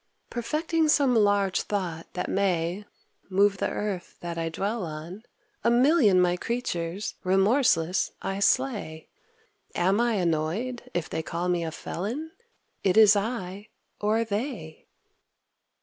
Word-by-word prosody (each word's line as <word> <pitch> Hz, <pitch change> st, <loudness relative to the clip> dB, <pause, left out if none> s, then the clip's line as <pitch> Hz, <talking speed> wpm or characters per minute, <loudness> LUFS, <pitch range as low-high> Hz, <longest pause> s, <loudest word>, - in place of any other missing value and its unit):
Perfecting 310 Hz, +6 st, 0 dB
some 280 Hz, -4 st, +4 dB
large 205 Hz, -4 st, +3 dB
thought 175 Hz, -5 st, -3 dB
that -, -, -3 dB
may 185 Hz, 0 st, 0 dB, 0.4 s
Move 200 Hz, +1 st, +3 dB
the -, -, 0 dB
earth 200 Hz, -4 st, -4 dB
that 170 Hz, -1 st, -4 dB
I 165 Hz, 0 st, -2 dB
dwell 200 Hz, +6 st, -2 dB
on, 165 Hz, +5 st, -7 dB, 0.4 s
A -, -, +4 dB
million 240 Hz, -, +5 dB
my 180 Hz, 0 st, +3 dB
creatures, 195 Hz, -5 st, -3 dB
remorseless, 190 Hz, -, +2 dB
I 195 Hz, 0 st, -3 dB
slay. 205 Hz, -9 st, 0 dB, 0.7 s
Am 190 Hz, +5 st, +2 dB
I 240 Hz, -1 st, +2 dB
annoyed 180 Hz, +8 st, -1 dB
if 175 Hz, -2 st, -1 dB
they -, -, -3 dB
call 170 Hz, +2 st, -3 dB
me 175 Hz, -1 st, +1 dB
a 165 Hz, -, -2 dB
felon! 225 Hz, -, -5 dB, 0.5 s
It 190 Hz, +1 st, +2 dB
is 215 Hz, -2 st, +8 dB
I, 200 Hz, -2 st, -3 dB, 0.3 s
or 215 Hz, +2 st, +1 dB
they. 210 Hz, -, -5 dB
200 Hz, 130 wpm, -26 LUFS, 175-230 Hz, 0.7 s, is